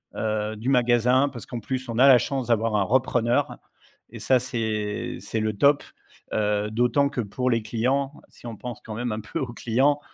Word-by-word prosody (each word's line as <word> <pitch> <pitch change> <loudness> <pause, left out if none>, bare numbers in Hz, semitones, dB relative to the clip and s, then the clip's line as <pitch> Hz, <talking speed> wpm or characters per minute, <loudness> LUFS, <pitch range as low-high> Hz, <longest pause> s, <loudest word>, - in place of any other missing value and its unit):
heu, 110 0 -2
du 115 +5 -3
magasin. 125 +2 +3
Parce 120 -4 -9
qu'en 120 - -6
plus, 130 +3 -4
on 115 - -3
a 135 - +7
la 130 -2 +9
chance 130 -1 -2
d'avoir 115 -1 +1
un 100 - +3
repreneur 120 +1 +1 0.5
et - - -10
ça, 130 -1 +3
c'est 110 -4 -3
c'est 115 - -4
le 110 0 -1
top, 140 +6 +4 0.5
heu, 105 0 0
d'autant 125 +5 +2
que 125 - -2
pour 125 +5 -2
les 115 -1 +1
clients, 130 +5 -1 0.2
si 120 - -13
on 115 - -6
pense 125 -1 -7
quand 110 -1 -7
même 120 0 -3
un 110 0 -3
peu 110 - -5
aux 130 -5 -4
clients, 135 +6 +1
120 Hz, 200 wpm, -25 LUFS, 110-130 Hz, 0.5 s, la